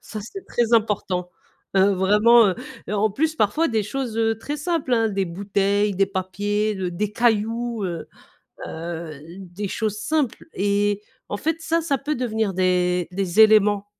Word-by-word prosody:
Ça 215 - -8
c'est 380 - -9
très 240 -1 -1
important, 195 -5 +1 0.5
heu, 195 +1 +5
vraiment, 210 +5 +5
heu, 185 - 0 0.3
heu, 210 - -2
en 210 +1 +2
plus 315 +7 0
parfois 305 +10 +2
des 220 -3 0
choses, 245 -1 -4
heu, 225 0 +2
très 290 +6 -4
simples, 300 -4 -2
hein, 225 -1 +3
des 195 -2 -1
bouteilles, 200 +3 0
des 195 +1 +2
papiers, 205 +2 -1
de 185 -2 -3
des 205 +4 -3
cailloux, 230 0 0
heu. 170 -3 -5 0.6
Heu, 165 -2 -6 0.2
des 195 +2 -6
choses 215 -2 -2
simples. 300 -5 -1
Et 205 +1 +1 0.3
en 205 - -3
fait, 320 +6 -1
ça, 330 +1 +1
ça 290 -4 0
peut 295 +4 -3
devenir 220 -5 -1
des 180 -1 +1
des 190 +1 -1
éléments. 210 -2 +5
210 Hz, 165 wpm, -23 LUFS, 190-230 Hz, 0.6 s, heu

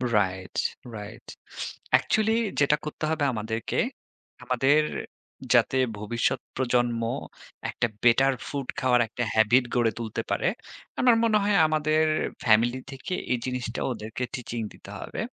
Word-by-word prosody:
Right, 95 -2 0 0.4
right. 105 -1 -9 0.7
Actually 210 +13 +3 0.3
যেটা 145 +1 +4
করতে 150 - -6
হবে 160 -2 0
আমাদেরকে, 110 0 -3 0.7
আমাদের 135 +4 +3 0.7
যাতে 130 - +4 0.2
ভবিষ্যৎ 105 +3 0 0.2
প্রজন্ম 120 -2 +1 0.7
একটা 120 - 0 0.2
বেটার 135 +3 +5
ফুড 140 -3 -4
খাওয়ার 125 -1 +3
একটা 120 +2 -3
হ্যাবিট 115 +4 +5
গড়ে 120 -2 +3
তুলতে 110 -2 -3
পারে। - - +1 0.5
আমার 245 -2 +6
মনে 220 -2 +4
হয় 205 0 +2
আমাদের 155 0 +2 0.4
ফ্যামিলি 120 +3 +4
থেকে 135 +7 -6 0.2
এই 125 - +3
জিনিসটা 125 -2 -3
ওদেরকে 110 +1 -5
টিচিং 120 -3 -4
দিতে - - -14
হবে। - - -7
125 Hz, 125 wpm, -26 LUFS, 115-140 Hz, 0.7 s, আমার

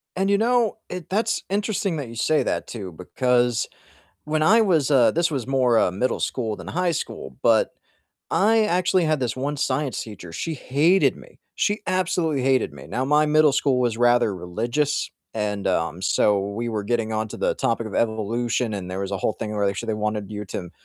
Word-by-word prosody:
And 195 +1 0
you 200 - +4
know, 235 0 +2
it 180 -3 -7
that's 220 +3 0
interesting 200 -3 -1
that 140 -4 -4
you 115 - -10
say 155 +7 +2
that - - -2
too 100 -6 -7
because 120 +7 0 0.6
when 155 +1 0
I 215 +9 +6
was, 160 -9 +2
uh 130 -5 +5
this 170 0 +1
was 135 -6 -3
more, 130 -3 +3
uh, - - +3
middle 100 +8 -1
school 110 -4 -2
than - - -9
high 180 0 0
school, - - -5
but - - +4 0.6
I 220 +2 +3
actually 180 -2 +2
had 155 -2 +1
this 125 -1 -1
one 140 +3 -2
science 145 -1 -1
teacher, 90 -6 -10
she 160 - -3
hated 155 +8 +2
me, - - -16 0.2
she 205 +1 0
absolutely 170 -6 0
hated 130 - +2
me, 70 -2 -11
now, 130 - -2
my 150 +2 +3
middle 150 -1 +4
school 135 -2 +2
was 120 -3 +1
rather 120 -3 +3
religious 120 - -1 0.3
and, 105 -2 -2
um, 85 -2 0
so, 105 +1 +3
we 100 +4 -3
were 110 -3 -3
getting 115 0 -1
onto 110 -1 -3
the - - 0
topic 115 0 -1
of 100 - -9
evolution 115 +1 0
and 95 -3 -5
there 95 +1 -4
was 100 0 -3
a 100 - -1
whole 100 - 0
thing 110 - -5
where 100 -1 +1
they - - +3
actually 115 +2 -3
wanted 105 -1 -3
you 105 0 -5
to 90 -2 -6
125 Hz, 200 wpm, -23 LUFS, 105-155 Hz, 0.6 s, I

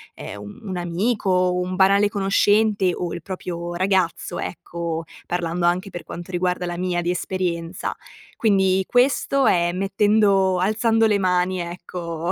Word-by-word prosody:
ehm, 100 - -8 0.2
un 205 - -7
un 185 - -3
amico, 190 +5 -1
o 180 -1 +2
un 180 +1 -2
banale 200 +2 +4
conoscente, 205 0 +2
o 175 -2 -3
il 170 - -6
proprio 175 -1 -5
ragazzo, 185 -2 0
ecco, 170 -1 -4 0.2
parlando 175 0 -1
anche 180 +3 +1
per 175 -2 -7
quanto 175 +3 -8
riguarda 180 0 -1
la 175 0 -4
mia 180 -1 -1
di 175 - -2
esperienza. 180 -1 -3 0.4
Quindi, 190 -3 +3
questo 270 +2 +2
è 175 -1 +3
mettendo 195 0 +2
alzando 225 +4 +2
le 210 -2 +3
mani 180 -1 +2
ecco, 170 -1 -4
185 Hz, 145 wpm, -22 LUFS, 175-195 Hz, 0.4 s, banale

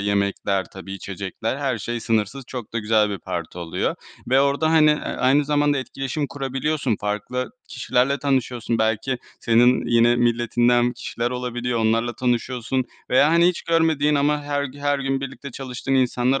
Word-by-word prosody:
yemekler, 100 -1 0
tabii 95 0 -9
içecekler, 100 +5 -4
her 135 -5 -1
şey 120 +3 -4
sınırsız, 115 +4 -1
çok 125 -5 -7
da 115 - -1
güzel 105 -1 +2
bir 100 - -4
parti 85 0 -5
oluyor 85 -1 -2 0.4
ve 130 +1 +5
orada, 140 +3 +2
hani, 155 -1 +6
ııı, 150 - -3
aynı 135 +3 +2
zamanda 145 -1 +2
etkileşim 135 +2 -3
kurabiliyorsun. 135 -2 -2
Farklı 105 +5 -3 0.2
kişilerle 135 +3 0
tanışıyorsun. 125 -4 -1
Belki 110 +4 0 0.2
senin 120 +2 +4
yine 120 +1 +4
milletinden 120 0 +2
kişiler 120 0 -3
olabiliyor, 125 -1 -2
onlarla 115 +2 +1
tanışıyorsun 125 +1 -1 0.3
veya, 140 +4 +5
hani, 170 +1 +5
hiç 180 - -2
görmediğin 160 -3 +2
ama 145 +1 +1
her 145 0 -1
g 140 +1 -8
her 145 0 +1
gün 135 0 -1
birlikte 140 +1 -7
çalıştığın 130 +1 -4
insanlar 130 +1 +2
125 Hz, 155 wpm, -22 LUFS, 115-140 Hz, 0.4 s, hani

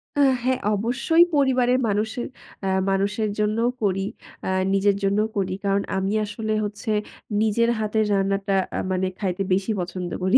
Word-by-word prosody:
আ - - -1 0.2
হ্যাঁ, 255 0 +1
অবশ্যই 245 - +3
পরিবারের 255 -3 +3
মানুষের 215 +3 -1 0.4
এ্যা 190 0 +1
মানুষের 205 +3 0
জন্যও 215 +3 +2
করি। 195 -2 +1 0.5
আ - - 0 0.2
নিজের 195 0 +3
জন্যও 205 +2 +2
করি। 185 -1 0
কারণ 200 0 +2 0.2
আমি 190 +2 0
আসলে 215 +1 -3
হচ্ছে 210 +2 -4 0.5
নিজের 220 +2 +2
হাতের 215 0 +1
রান্নাটা 195 0 0 0.2
আ - - 0
মানে 185 0 +1
খাইতে 195 -1 -1
বেশি 195 +3 0
পছন্দ 180 0 -4
করি 190 +8 +5
205 Hz, 150 wpm, -24 LUFS, 195-225 Hz, 0.5 s, করি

